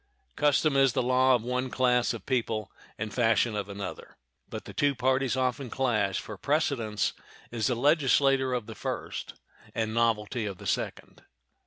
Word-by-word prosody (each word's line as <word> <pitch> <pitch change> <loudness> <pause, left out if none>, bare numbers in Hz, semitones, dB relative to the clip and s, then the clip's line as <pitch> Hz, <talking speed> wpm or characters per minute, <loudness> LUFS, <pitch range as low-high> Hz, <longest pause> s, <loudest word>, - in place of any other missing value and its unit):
Custom 150 0 +3
is 135 -2 +4
the - - +1
law 130 +1 +4
of 120 - -2
one 125 +1 -2
class 125 -1 +2
of 115 -5 -7
people 115 -5 -1 0.3
and 105 0 -4
fashion 115 -2 +2
of 105 -1 -3
another; 100 -1 -7 0.3
but - - -7
the - - -9
two 145 -1 +1
parties 130 +1 +1
often 130 0 -1
clash, 110 -7 0
for 110 - -8
precedence 140 -8 0 0.4
is 115 -2 0
the 125 - +1
legislator 135 -1 +3
of 125 -3 -1
the - - -8
first - - -5 0.4
and 110 -1 -1
novelty 115 0 0
of 100 -2 -5
the - - -11
second. - - -3
125 Hz, 165 wpm, -28 LUFS, 110-130 Hz, 0.4 s, is